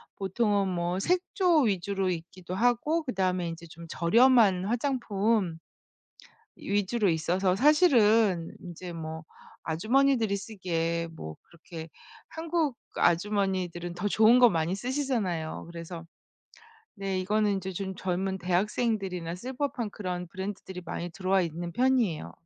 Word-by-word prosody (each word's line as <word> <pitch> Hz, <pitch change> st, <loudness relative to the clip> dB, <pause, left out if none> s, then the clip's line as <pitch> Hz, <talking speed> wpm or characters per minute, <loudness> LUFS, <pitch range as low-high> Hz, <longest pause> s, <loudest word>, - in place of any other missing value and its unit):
보통은 200 Hz, 0 st, 0 dB
뭐 175 Hz, 0 st, -1 dB
색조 360 Hz, -, +2 dB
위주로 195 Hz, -2 st, 0 dB
있기도 180 Hz, +1 st, -5 dB
하고 245 Hz, -, +1 dB
그다음에 185 Hz, -, -1 dB
인제 165 Hz, 0 st, -8 dB
좀 165 Hz, +1 st, -11 dB
저렴한 210 Hz, +1 st, +4 dB
화장품 220 Hz, -, 0 dB, 1.0 s
위주로 205 Hz, +2 st, 0 dB
있어서 180 Hz, +3 st, +1 dB
사실은 225 Hz, -, +4 dB
인제 175 Hz, 0 st, -8 dB
뭐 160 Hz, -1 st, -6 dB, 0.4 s
아주머니들이 225 Hz, +5 st, +2 dB
쓰기에 170 Hz, -5 st, -2 dB
뭐 80 Hz, -, -7 dB
그렇게 165 Hz, -1 st, -10 dB, 0.4 s
한국 320 Hz, -4 st, -1 dB, 0.2 s
아주머니들은 180 Hz, -2 st, 0 dB
더 180 Hz, +4 st, -3 dB
좋은 220 Hz, +4 st, +5 dB
거 245 Hz, -1 st, +8 dB
많이 165 Hz, 0 st, 0 dB
쓰시잖아요. 230 Hz, -, -2 dB
그래서 170 Hz, 0 st, -8 dB, 0.9 s
네 195 Hz, -2 st, -2 dB
이거는 205 Hz, +1 st, +1 dB
이제 190 Hz, 0 st, -5 dB
좀 190 Hz, +1 st, -4 dB
젊은 190 Hz, +1 st, -2 dB
대학생들이나 185 Hz, -1 st, -1 dB
쓸 250 Hz, +8 st, -6 dB
법한 255 Hz, -5 st, -2 dB
그런 180 Hz, -3 st, -4 dB
브랜드들이 190 Hz, 0 st, -6 dB
많이 170 Hz, +1 st, -5 dB
들어와 190 Hz, +1 st, +1 dB
있는 170 Hz, +1 st, -4 dB
편이에요. 245 Hz, -8 st, +1 dB
190 Hz, 295 characters per minute, -28 LUFS, 175-230 Hz, 1.0 s, 거